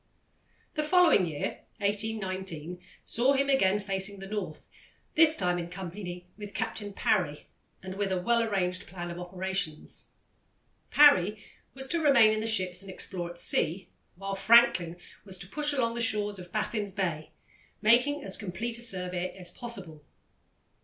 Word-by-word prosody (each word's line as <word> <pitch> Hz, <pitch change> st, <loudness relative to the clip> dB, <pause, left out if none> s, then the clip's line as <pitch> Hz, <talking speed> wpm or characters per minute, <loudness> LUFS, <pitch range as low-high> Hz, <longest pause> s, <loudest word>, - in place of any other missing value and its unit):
The 305 Hz, -, -1 dB
following 325 Hz, -, +5 dB
year, 150 Hz, -3 st, -4 dB, 0.2 s
1819, 190 Hz, -5 st, -3 dB, 0.2 s
saw 255 Hz, +4 st, +2 dB
him 275 Hz, 0 st, +1 dB
again 205 Hz, -8 st, +4 dB
facing 195 Hz, 0 st, 0 dB
the 195 Hz, -, -8 dB
North, 195 Hz, -6 st, -5 dB, 0.5 s
this 320 Hz, 0 st, +6 dB
time 180 Hz, -1 st, 0 dB
in 170 Hz, 0 st, -5 dB
company 180 Hz, 0 st, -7 dB
with 205 Hz, -2 st, -8 dB
Captain 210 Hz, -1 st, -3 dB
Parry, 180 Hz, -7 st, 0 dB, 0.4 s
and 185 Hz, 0 st, -6 dB
with 195 Hz, 0 st, -2 dB
a 185 Hz, -, +1 dB
well 235 Hz, +5 st, +2 dB
arranged 185 Hz, -5 st, -1 dB
plan 175 Hz, -1 st, -6 dB
of 170 Hz, -, -7 dB
operations. 180 Hz, -3 st, -3 dB, 0.8 s
Parry 210 Hz, -8 st, +5 dB, 0.3 s
was 265 Hz, 0 st, -5 dB
to 335 Hz, +2 st, 0 dB
remain 270 Hz, -8 st, +6 dB
in 215 Hz, -, -1 dB
the 220 Hz, -, -2 dB
ships 185 Hz, -4 st, +1 dB
and 195 Hz, -, -8 dB
explore 180 Hz, -2 st, -4 dB
at 175 Hz, -, -9 dB
sea, 175 Hz, +1 st, +1 dB, 0.3 s
while 195 Hz, +2 st, -5 dB
Franklin 195 Hz, -5 st, +5 dB, 0.3 s
was 190 Hz, -2 st, -5 dB
to 175 Hz, -, -2 dB
push 295 Hz, +8 st, 0 dB
along 240 Hz, -5 st, 0 dB
the 235 Hz, -, -3 dB
shores 210 Hz, -3 st, +1 dB
of 180 Hz, -1 st, -10 dB
Baffin's 210 Hz, -2 st, -2 dB
Bay, 170 Hz, -6 st, -2 dB, 0.5 s
making 250 Hz, +7 st, +4 dB
as 195 Hz, -, +1 dB
complete 220 Hz, +4 st, -4 dB
a -, -, -4 dB
survey 180 Hz, -4 st, -2 dB
as 180 Hz, -2 st, -6 dB
possible. 175 Hz, -10 st, -8 dB
195 Hz, 155 wpm, -29 LUFS, 180-225 Hz, 0.8 s, this